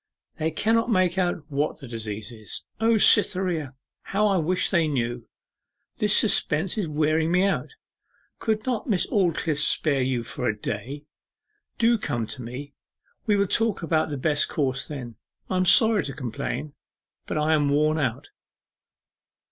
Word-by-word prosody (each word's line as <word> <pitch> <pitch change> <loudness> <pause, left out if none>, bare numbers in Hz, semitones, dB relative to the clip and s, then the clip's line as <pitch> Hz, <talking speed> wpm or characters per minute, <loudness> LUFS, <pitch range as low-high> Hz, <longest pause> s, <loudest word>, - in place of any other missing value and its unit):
They 160 - 0
cannot 225 +8 +1
make 185 -4 +2
out 175 -3 -1
what 145 +2 -1
the 135 - -10
disease 110 -2 -6
is. 110 -3 -8
O 225 0 +3
Cytherea! 180 - +4 0.3
how 210 +2 0
I 200 -2 +2
wish 180 +2 0
they 170 -4 +2
knew! 120 -4 -2 0.7
This 210 -1 +4
suspense 175 -4 +1
is 205 -6 -2
wearing 155 +2 +1
me 180 +2 +3
out. 200 - -2 0.6
Could 215 -1 -1
not 250 -1 -2
Miss 195 -5 +2
Aldclyffe 170 -6 +1
spare 150 -2 +2
you 125 -2 -1
for 125 +1 -4
a 105 - -1
day? 130 +9 -5 0.7
Do 235 0 +3
come 120 - -2
to 125 - -8
me. 130 +5 -8 0.5
We 210 - +3
will 200 0 +2
talk 215 -1 0
about 160 -1 +1
the 145 - -4
best 150 +2 +1
course 135 -5 -1
then. 125 -7 -7 0.3
I 185 - +1
am 185 - +2
sorry 220 0 +5
to 135 - -4
complain, 140 +2 -5 0.5
but - - -3
I 155 +1 +2
am 145 -2 +2
worn 155 +2 +2
out. 125 -4 -3
155 Hz, 160 wpm, -25 LUFS, 135-195 Hz, 0.7 s, sorry